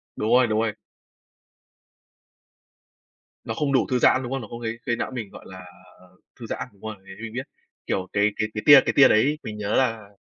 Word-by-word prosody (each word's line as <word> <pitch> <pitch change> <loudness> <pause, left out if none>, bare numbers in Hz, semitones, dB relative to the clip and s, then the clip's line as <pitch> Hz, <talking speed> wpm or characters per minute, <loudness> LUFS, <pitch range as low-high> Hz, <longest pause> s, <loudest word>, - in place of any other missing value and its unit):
Đúng 110 - -2
rồi, 125 0 +5
đúng 110 -1 0
rồi. 110 -2 -1 2.7
Nó - - -4
không 140 +4 -1
đủ 130 - +2
thư 125 - +2
giãn, 130 +2 +4
đúng 125 - -6
không? 135 - -2
Nó 110 - -9
có 120 - -8
gây 115 -1 -5
gây 120 - 0
não - - -4
mình, 115 -6 -6
gọi - - -13
là, 95 - -11
à, 90 - -11 0.3
ờ, 90 0 -22 0.2
thư 120 - -8
giãn, 115 - -5
đúng 100 - -26
rồi, 110 -1 -6
mình 95 0 -14
mình 110 -1 -7
biết. 130 +3 -5 0.4
Kiểu, 95 -1 -2
cái 100 0 +3
cái 110 - -1
cái 105 - -4
tia 145 -2 +9
cái - - 0
tia 135 -2 +8
đấy 145 +8 +2
mình 105 -1 -7
nhớ 105 0 -2
là 115 -5 0
110 Hz, 230 wpm, -24 LUFS, 105-130 Hz, 2.7 s, tia